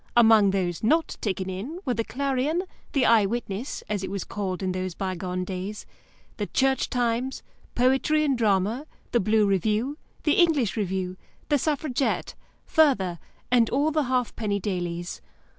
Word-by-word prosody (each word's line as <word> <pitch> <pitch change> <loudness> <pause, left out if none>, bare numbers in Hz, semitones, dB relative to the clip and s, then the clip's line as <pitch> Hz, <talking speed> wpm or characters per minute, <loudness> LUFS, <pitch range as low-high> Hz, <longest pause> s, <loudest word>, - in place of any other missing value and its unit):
Among 220 -3 +7
those 180 -3 -1
not 315 +9 +2
taken 190 -3 -2
in 205 - -5
were 255 - +1
the 230 - -1
Clarion, 280 +7 -1 0.3
the 270 -4 +3
Eye 220 -4 +5
Witness 230 +2 -4
(as 205 -2 -2
it - - -3
was 195 0 -3
called 195 -2 -4
in 185 - 0
those 185 -1 -3
bygone 185 -1 -3
days) 190 +3 -5 0.5
the 205 - -2
Church 265 0 +1
Times, 245 +1 -1 0.3
Poetry 265 +5 +3
and 280 -3 +2
Drama, 220 +4 +1 0.2
the 240 - +3
Blue 215 +1 +3
Review, 215 - 0 0.2
the 300 - +3
English 300 - +2
Review, 190 -3 -2 0.3
the 290 -2 +3
Suffragette, 285 -2 -1 0.3
Further, 245 - +3 0.3
and 235 -3 +4
all 290 +4 +2
the 305 -2 +1
halfpenny 235 -5 -1
dailies. 175 -3 -3
220 Hz, 150 wpm, -26 LUFS, 190-265 Hz, 0.5 s, Among